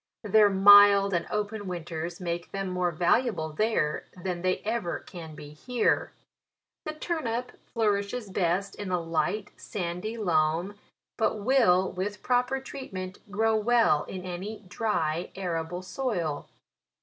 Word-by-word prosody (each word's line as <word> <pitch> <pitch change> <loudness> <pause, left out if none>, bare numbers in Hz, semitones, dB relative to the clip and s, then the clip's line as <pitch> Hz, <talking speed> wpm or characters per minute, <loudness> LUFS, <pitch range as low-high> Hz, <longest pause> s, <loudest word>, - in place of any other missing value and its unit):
Their 210 0 +5
mild 200 0 +7
and 175 - 0
open 210 -1 -3
winters 170 -1 -5
make 175 -1 -4
them 195 -1 -3
more 180 -1 0
valuable 170 0 +1
there 215 -5 0
than 180 -1 -4
they 185 0 +1
ever 220 -5 -1
can 160 -3 -10
be 145 - -10
here. 240 +10 0 0.7
The 310 - -3
turnip 250 -8 -3 0.2
flourishes 210 0 -1
best 185 +1 0
in 205 -2 -6
a 180 -1 +1
light, 180 +5 -1
sandy 180 +4 -4
loam, 170 -1 +1 0.4
but 220 - +1
will, 200 -7 +4
with 200 +3 -4
proper 250 +1 +1
treatment, 195 -9 -7
grow 220 +2 +2
well 220 -8 +3
in 185 -1 -7
any 185 +5 -6
dry, 180 -5 -1
arable 175 -1 -3
soil. 185 - -3
195 Hz, 130 wpm, -28 LUFS, 175-220 Hz, 0.7 s, mild